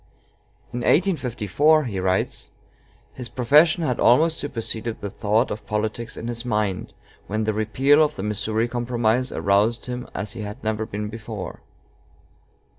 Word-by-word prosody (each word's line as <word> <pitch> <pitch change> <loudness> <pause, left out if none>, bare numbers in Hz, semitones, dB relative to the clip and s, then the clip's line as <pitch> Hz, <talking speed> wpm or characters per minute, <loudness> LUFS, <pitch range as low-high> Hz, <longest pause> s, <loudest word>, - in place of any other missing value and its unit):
"In 120 - -2
1854," 150 - +2
he 105 -8 -3
writes, 95 0 -1 0.6
"his 125 -2 -8
profession 150 +7 +4
had 125 -6 -1
almost 160 +7 +4
superseded 115 -4 -3
the 100 - -5
thought 105 +4 +1
of 105 - -6
politics 110 +2 -3
in 115 - -5
his 120 0 -3
mind, 105 -5 -2 0.3
when 110 +2 -1
the 110 0 0
repeal 130 +8 +3
of 150 0 -1
the 95 - -5
Missouri 110 +2 0
Compromise 120 0 0
aroused 105 +4 +1
him 125 0 -5
as 105 0 -2
he - - -6
had 105 +5 -7
never 110 0 -1
been 105 +1 -4
before." 110 -3 -7
115 Hz, 145 wpm, -23 LUFS, 105-125 Hz, 0.6 s, profession